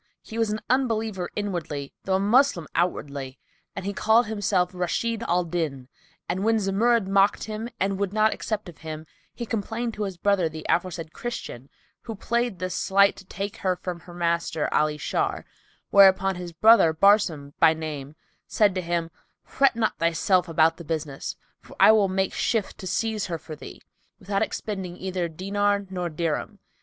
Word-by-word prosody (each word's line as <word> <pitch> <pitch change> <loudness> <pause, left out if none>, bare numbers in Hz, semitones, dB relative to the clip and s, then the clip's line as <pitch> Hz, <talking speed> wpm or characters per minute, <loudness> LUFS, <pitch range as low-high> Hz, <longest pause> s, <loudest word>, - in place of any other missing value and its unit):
He 225 - -6
was 225 -2 +2
an 215 +1 -2
Unbeliever 225 -7 0
inwardly, 170 -9 -4
though 190 - +1
a - - +2
Moslem 210 - +3
outwardly, 140 -6 -2 0.4
and 195 - -5
had 200 0 -3
called 225 +2 +4
himself 200 -4 0
Rashid 215 +6 -1
al 180 +1 +2
Din;[FN#290] 160 -7 -3 0.4
and 185 +3 -2
when 225 +1 +3
Zumurrud 215 +2 +2
mocked 195 +1 +3
him 220 +2 -5
and 195 0 0
would 200 -2 -1
not 215 +1 +3
accept 215 -2 -4
of 175 - -12
him, 155 -1 -7 0.3
he 235 - -5
complained 225 +2 -3
to 210 -1 -3
his 190 -3 -6
brother 190 -3 +2
the 155 0 -9
aforesaid 170 -2 -1
Christian 140 - -6 0.3
who 225 - -7
played 235 0 -1
this 185 +1 -3
sleight 200 +1 +3
to 195 - -12
take 200 +3 -5
her 185 -1 0
from 180 -1 -6
her 175 - -13
master 170 -2 -1
Ali 150 0 +2
Shar; - - -2 0.5
whereupon 195 -1 +6
his 175 -1 -7
brother, 190 -1 +6
Barsum 170 -7 +3
by 160 - +6
name 150 -2 -6 0.3
said 205 -3 +3
to 185 - -2
him, 170 -1 -2 0.3
"Fret 275 -3 +2
not 225 -1 -1
thyself 170 +2 +2
about 165 0 +3
the 170 - -9
business, 155 -3 -4 0.3
for - - -15
I - - +8
will 210 -3 +4
make 190 0 0
shift 225 -4 -1
to 185 - -6
seize 220 +2 -1
her 170 -2 -3
for 155 -1 -9
thee, - - -11 0.4
without 195 0 -2
expending 190 -4 -3
either 185 -2 -2
diner 200 +4 0
or 175 -1 -2
dirham. 165 +6 -3
190 Hz, 175 wpm, -25 LUFS, 170-210 Hz, 0.5 s, I